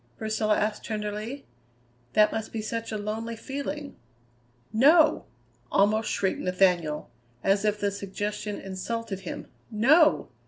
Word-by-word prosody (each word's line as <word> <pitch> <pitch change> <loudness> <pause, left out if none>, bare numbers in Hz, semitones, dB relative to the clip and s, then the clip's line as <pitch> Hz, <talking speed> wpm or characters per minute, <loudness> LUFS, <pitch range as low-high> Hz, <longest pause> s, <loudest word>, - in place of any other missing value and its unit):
Priscilla 215 -1 +1
asked 210 0 -1
tenderly. 215 +4 -4 0.7
"That 210 +5 +5
must 220 -1 -4
be 225 - -3
such 230 +1 -4
a 215 - -2
lonely 220 +2 -4
feeling." 280 +4 -5 0.8
"No!" 300 +7 +5 0.5
almost 215 +2 +3
shrieked 190 - 0
Nathaniel, 180 -6 +1 0.3
as 200 +2 +2
if 210 0 +1
the 205 -1 0
suggestion 205 +1 -4
insulted 195 +2 -4
him; 185 - -6 0.2
"no! 275 +9 +4
215 Hz, 120 wpm, -27 LUFS, 200-230 Hz, 0.8 s, That